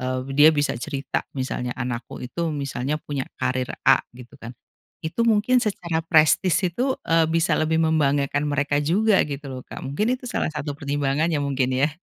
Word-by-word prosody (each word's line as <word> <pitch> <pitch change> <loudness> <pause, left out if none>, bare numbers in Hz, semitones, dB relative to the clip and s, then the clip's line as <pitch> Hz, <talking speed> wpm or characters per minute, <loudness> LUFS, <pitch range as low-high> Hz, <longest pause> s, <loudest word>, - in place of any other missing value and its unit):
eee, 130 0 -2 0.2
dia 150 +2 +8
bisa 145 -1 0
cerita 135 +3 -3
misalnya 125 -2 -3
anakku 125 -2 -5
itu 165 +7 -3
misalnya 140 0 -2
punya 140 -3 -4
karir 130 0 -1 0.2
A - - +6 0.2
gitu 125 +2 -13
kan, 115 -1 -8 0.5
itu 160 +8 -3
mungkin 230 +3 +3
secara 170 -7 -2
prestise 165 +3 +3
itu, 260 +5 0
eee, 165 0 +3
bisa 165 +1 +1
lebih 160 +1 +1
membanggakan 145 -2 +1
mereka 145 0 0
juga 200 +7 +3
gitu 140 0 -6
loh, 130 -1 -7
Kak, - - -9
mungkin 210 - 0
itu - - -15
salah - - -1
satu 150 -1 -4
pertimbangannya 145 +2 0
mungkin 135 -2 0
ya? 135 +3 +2
145 Hz, 170 wpm, -23 LUFS, 135-165 Hz, 0.5 s, dia